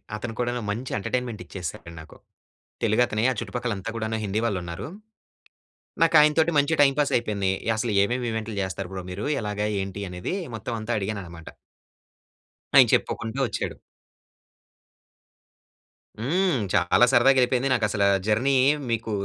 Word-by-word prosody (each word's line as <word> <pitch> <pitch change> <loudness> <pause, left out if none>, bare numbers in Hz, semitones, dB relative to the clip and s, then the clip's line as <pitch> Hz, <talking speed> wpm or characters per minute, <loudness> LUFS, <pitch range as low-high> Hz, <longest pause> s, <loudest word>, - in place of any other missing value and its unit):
అతను 115 +2 -5
కూడాను 120 0 -1
మంచి 120 +5 -5
ఎంటర్టైన్మెంట్ 120 +1 -3
ఇచ్చేసాడు 85 -2 -7
నాకు. 80 - -15 0.7
తెలుగు 110 +2 +3
అతనే 110 -1 -2
ఆ - - +1
చుట్టుపక్కల 120 +1 -3
అంతా 95 +4 -5
కూడాను 110 0 -2
హిందీ 100 +2 -1
వాళ్ళు 100 -5 -1
ఉన్నారు. 85 +8 -6 1.2
నాకు 165 0 +3
ఆయనతోటి 155 +2 +3
మంచిగా 145 +3 +2
టైం 135 - +4
పాస్ 145 - +2
అయిపోయింది. 100 -5 -1 0.2
అసలు 110 +1 -1
ఏమేమి 120 +4 -1
ఈవెంట్‌లు 110 -1 -4
చేస్తారు 95 0 -4
బ్రో 95 -1 -5
మీరు, 100 +3 -5 0.2
ఎలాగా, 105 0 -2
ఏంటి 95 +1 -5
అనేది 90 - -4 0.2
మొత్తం 115 +2 -5
అంతా 110 +2 -4
అడిగానన్నమాట. 95 -5 -6 1.3
ఆయన - - +9
చెప్పుకుంటూ 115 +4 -1
వచ్చాడు. - - -4 2.4
హ్మ్. 160 - +1
చాలా 90 +7 +4
సరదాగెళ్ళిపోయింది. 130 0 +4
నాకు 115 -4 +2
అసలు 100 -2 +1 0.2
జర్నీ 120 +6 +2 0.3
మీకు 115 -1 -2
110 Hz, 135 wpm, -25 LUFS, 100-125 Hz, 2.4 s, ఆయన